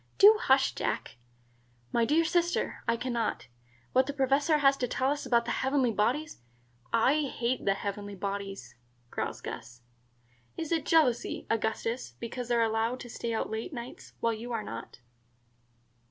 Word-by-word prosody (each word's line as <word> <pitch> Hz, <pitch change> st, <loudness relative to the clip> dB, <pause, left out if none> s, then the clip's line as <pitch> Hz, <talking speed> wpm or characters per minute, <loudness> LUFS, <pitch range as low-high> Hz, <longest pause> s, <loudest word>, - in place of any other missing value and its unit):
"Do 425 Hz, +2 st, +8 dB
hush, 265 Hz, 0 st, +4 dB
Jack." -, -, -3 dB, 0.7 s
"My 235 Hz, -, +3 dB
dear 315 Hz, +6 st, +3 dB
sister, 345 Hz, +1 st, 0 dB
I 230 Hz, 0 st, +2 dB
can 250 Hz, +1 st, -3 dB
not. 230 Hz, -2 st, -1 dB, 0.5 s
What 260 Hz, +1 st, +4 dB
the 285 Hz, -, -2 dB
Professor 280 Hz, +3 st, +3 dB
has 275 Hz, -2 st, +5 dB
to 250 Hz, -, -1 dB
tell 260 Hz, +3 st, +1 dB
us 290 Hz, -2 st, -3 dB
about 235 Hz, -2 st, +3 dB
the -, -, -2 dB
heavenly 265 Hz, -2 st, +2 dB
bodies 245 Hz, -, 0 dB, 0.3 s
" 120 Hz, +1 st, -34 dB, 0.2 s
"I 300 Hz, 0 st, +2 dB
hate 245 Hz, +1 st, -1 dB
the 195 Hz, -, +3 dB
heavenly 200 Hz, 0 st, -5 dB
bodies," 195 Hz, -7 st, -5 dB, 0.4 s
growls -, -, -3 dB
Gus. 120 Hz, +1 st, -8 dB, 0.7 s
"Is 325 Hz, -1 st, -4 dB
it 330 Hz, -2 st, 0 dB
jealousy, 295 Hz, -8 st, +2 dB
Augustus, 225 Hz, -, -1 dB
because 245 Hz, +1 st, -5 dB
they 240 Hz, -, +2 dB
are 230 Hz, -, +4 dB
allowed 225 Hz, +3 st, 0 dB
to 240 Hz, -, -8 dB
stay 235 Hz, -, -3 dB
out 225 Hz, -, -2 dB
late 220 Hz, +9 st, -4 dB
nights, 240 Hz, -1 st, -8 dB
while 230 Hz, 0 st, +2 dB
you 230 Hz, +3 st, -6 dB
are 225 Hz, -2 st, -2 dB
not?" 115 Hz, -, -7 dB
240 Hz, 170 wpm, -30 LUFS, 220-275 Hz, 0.7 s, Do